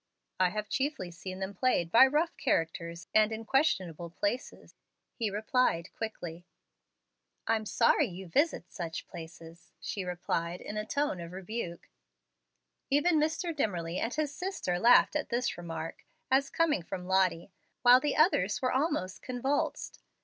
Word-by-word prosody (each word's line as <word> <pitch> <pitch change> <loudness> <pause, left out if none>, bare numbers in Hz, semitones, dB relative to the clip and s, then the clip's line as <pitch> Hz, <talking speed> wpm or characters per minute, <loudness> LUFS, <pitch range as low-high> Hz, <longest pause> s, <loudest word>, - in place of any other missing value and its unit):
"I 185 -1 +4
have 210 +3 -4
chiefly 260 - -2
seen 185 +2 -7
them 190 +1 -4
played 185 -6 +1
by 250 +4 +8
rough 305 +5 0
characters, 170 - -1
and 215 0 +5
in 220 0 -5
questionable 185 - +1
places," 205 +8 -4 0.4
he 225 -4 -1
replied 210 -4 0
quickly. 175 -6 -6 1.0
"I'm 220 -1 0
sorry 245 +6 +3
you 185 -1 -8
visit 280 - 0
such 165 -2 -5
places," 165 0 -11
she 200 - -4
replied 175 -1 -2
in 210 - -7
a 215 0 -3
tone 285 -7 -1
of 170 +1 -8
rebuke. 185 -2 -5 1.0
Even 305 +3 +3
Mr. 320 +2 -1
Dimmerly 180 - -1
and 230 - -1
his 300 -2 -1
sister 360 - -2
laughed 245 +6 +6
at 300 - -1
this 240 0 0
remark, 165 -2 -6 0.3
as 275 +1 +3
coming 325 - +1
from 180 +2 -6
Lottie, 185 -1 +1 0.3
while 245 +1 +8
the 295 +1 -1
others 255 - +3
were 255 - 0
almost 260 - -1
convulsed. 260 +3 -2
210 Hz, 145 wpm, -30 LUFS, 175-265 Hz, 1.0 s, by